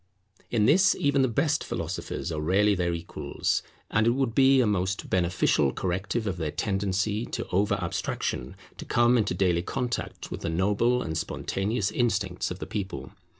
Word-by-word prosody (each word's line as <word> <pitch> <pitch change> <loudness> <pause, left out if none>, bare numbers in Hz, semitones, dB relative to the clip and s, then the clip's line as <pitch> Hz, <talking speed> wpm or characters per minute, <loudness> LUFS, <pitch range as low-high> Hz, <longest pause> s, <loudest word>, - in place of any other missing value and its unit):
In 110 -3 +2
this 190 - +5
even 140 -1 +2
the 130 - +4
best 150 +6 +1
philosophers 85 0 -4
are 75 -1 -2
rarely 100 +6 +3
their 90 -2 0
equals; 85 0 -2 0.3
and 105 +2 +3
it 120 - +3
would 130 -4 0
be 135 +1 +5
a 125 - +4
most 100 -2 -1
beneficial 90 0 +2
corrective 95 +5 -2
of 95 -3 -2
their 80 -2 -2
tendency 100 +4 -1
to - - -4
over 100 +3 +2
abstraction 85 -8 -3 0.2
to - - -7
come 120 +1 +3
into 110 -4 +1
daily 90 -3 +2
contact 125 +5 -4
with - - -5
the 85 - -2
noble 105 +8 +2
and 80 0 -2
spontaneous 100 +5 -2
instincts 105 -6 0
of 90 - -5
the - - -6
people. 100 -3 -5
100 Hz, 170 wpm, -27 LUFS, 90-120 Hz, 0.3 s, this